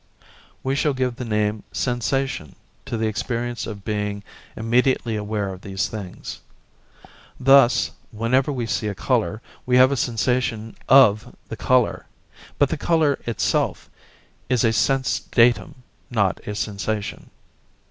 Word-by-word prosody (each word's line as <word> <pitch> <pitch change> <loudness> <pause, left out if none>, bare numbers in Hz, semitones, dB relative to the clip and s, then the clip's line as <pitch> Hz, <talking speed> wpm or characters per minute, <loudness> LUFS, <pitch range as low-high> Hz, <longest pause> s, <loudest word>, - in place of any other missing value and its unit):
We 135 +1 0
shall 140 0 +1
give 125 -2 -1
the 125 - -5
name 105 -1 0
'sensation' 125 - -2 0.3
to 115 - -2
the 110 - 0
experience 120 +2 -3
of 100 -3 -8
being 105 -1 -2 0.3
immediately 120 +1 +1
aware 105 -2 -2
of 95 - -11
these 95 -1 -2
things. 100 -5 -7 1.0
Thus, 135 -1 +5 0.2
whenever 125 +6 +1
we 125 -4 -2
see 110 -1 -2
a 100 - -3
colour, 110 -1 -1 0.2
we 125 0 +2
have 130 +1 +6
a - - +1
sensation 115 -1 -1
of 120 -6 +5
the - - -4
colour, 130 -1 +1 0.5
but 145 - +3
the 160 - -2
colour 155 -2 +2
itself 115 - -1 0.6
is 125 -3 +2
a 115 - +3
sense 135 +3 +1
datum, 120 +1 +2 0.3
not 100 -5 +1
a 105 - -3
sensation. 105 0 -4
115 Hz, 135 wpm, -22 LUFS, 105-130 Hz, 1.0 s, have